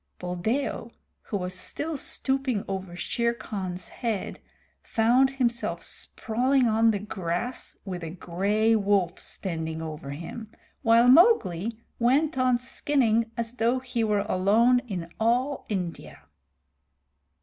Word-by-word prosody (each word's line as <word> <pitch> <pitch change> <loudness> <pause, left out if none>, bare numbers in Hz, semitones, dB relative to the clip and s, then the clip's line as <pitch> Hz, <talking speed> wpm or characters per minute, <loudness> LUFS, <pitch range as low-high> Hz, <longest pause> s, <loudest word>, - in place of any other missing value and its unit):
Buldeo, 220 +8 -2 0.3
who 205 - -3
was 180 -1 -4
still 300 - -3
stooping 265 -5 -1
over 190 -2 -5
Shere 235 +6 -1
Khan's 190 -5 -5
head, 225 -5 -3 0.4
found 245 +4 +3
himself 245 -3 -1
sprawling 250 +3 +1
on 225 +1 +4
the 215 - +2
grass, 195 +3 -4
with 180 -3 -5
a 165 - -4
gray 200 +6 +1
wolf 200 -4 +1
standing 160 -3 -4
over 155 -3 -6
him, 170 +10 -7 0.3
while 230 +1 +5
Mowgli 230 - +5 0.2
went 275 +6 +3
on 255 -1 +3
skinning 240 -3 +1
as 230 0 -3
though 235 +2 +2
he 250 -2 -2
were 210 -2 +2
alone 220 +7 +4
in 175 -5 -5
all 250 +5 +1
India. 180 -5 -5
225 Hz, 120 wpm, -26 LUFS, 185-245 Hz, 0.4 s, while